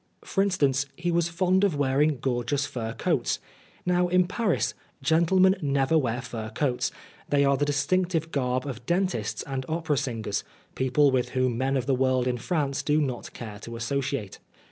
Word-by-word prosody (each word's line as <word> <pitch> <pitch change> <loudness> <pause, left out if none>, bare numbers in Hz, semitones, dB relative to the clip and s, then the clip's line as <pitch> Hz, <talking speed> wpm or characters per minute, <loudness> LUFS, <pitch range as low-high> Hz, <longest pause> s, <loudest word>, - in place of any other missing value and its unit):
For 195 - +1
instance, 140 -9 +2
he 175 0 -1
was 170 0 +1
fond 185 +3 +2
of 195 -6 +3
wearing 145 +1 +2
gor 120 -1 -1
geous 140 +3 0
fur 120 -5 -4
coats. - - 0 0.5
Now, 180 0 +2
in 180 0 +3
Paris, 195 +1 0 0.3
gentlemen 185 +5 +4
never 140 0 +1
wear 130 -4 +1
fur 110 -3 -5
coats; 125 0 0 0.4
they 140 -1 +3
are 140 0 +4
the 145 - +1
distinctive 165 +3 0
garb 130 -1 0
of 125 -4 -6
dentists 175 - 0
and 135 -1 -4
opera 160 -2 0
singers, 115 -6 -2 0.3
people 130 +2 +3
with 130 -2 +1
whom 130 -2 +2
men 135 +3 0
of 130 - -1
the 135 - +2
world 130 -1 +2
in 125 -1 -1
France 145 -2 -1
do 150 +1 +2
not 130 -5 -2
care 105 -3 -8
to 115 +2 -8
associate. 125 -2 -2
140 Hz, 175 wpm, -26 LUFS, 125-165 Hz, 0.5 s, gentlemen